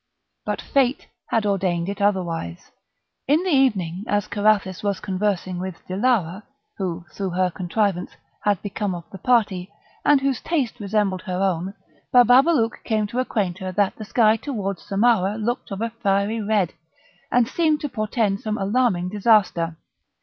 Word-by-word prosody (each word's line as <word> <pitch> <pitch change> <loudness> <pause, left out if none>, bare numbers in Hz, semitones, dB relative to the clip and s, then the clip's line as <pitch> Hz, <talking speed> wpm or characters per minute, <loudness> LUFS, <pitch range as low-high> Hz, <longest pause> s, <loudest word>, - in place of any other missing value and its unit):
But - - -3
Fate 270 -1 +1 0.2
had 225 -2 0
ordained 185 -4 0
it 200 +1 -4
otherwise. 170 - -1 0.6
In 300 +6 +3
the 375 - 0
evening, 200 - +2
as 205 -1 +1
Carathis 205 -3 +1
was 200 -2 -1
conversing 185 -2 -2
with 185 -2 -5
Dilara, 195 -2 0 0.4
who, 180 -2 -3
through 195 -2 -3
her 180 0 0
contrivance, 185 +1 -1 0.3
had 205 -3 +2
become 205 -2 -2
of 170 - -7
the 195 - -9
party, 200 -5 +1 0.3
and 290 -1 +5
whose 270 -2 -1
taste 275 -8 -1
resembled 200 -2 0
her 180 -1 -2
own, 190 +1 -1 0.4
Bababalouk 250 0 +4
came 215 -2 0
to 235 +5 -3
acquaint 200 -8 -1
her 185 0 -4
"that 200 0 +1
the 220 - -8
sky 220 0 +3
towards 205 -8 -4
Samarah 205 -1 +2
looked 235 +3 -2
of 195 0 -5
a 230 0 -1
fiery 210 0 0
red, 205 -4 +1 0.6
and 245 -2 +3
seemed 310 +2 +1
to 295 - -3
portend 215 -3 -1
some 215 -2 -3
alarming 195 -3 +1
disaster." 195 -6 +2
205 Hz, 155 wpm, -23 LUFS, 185-230 Hz, 0.6 s, and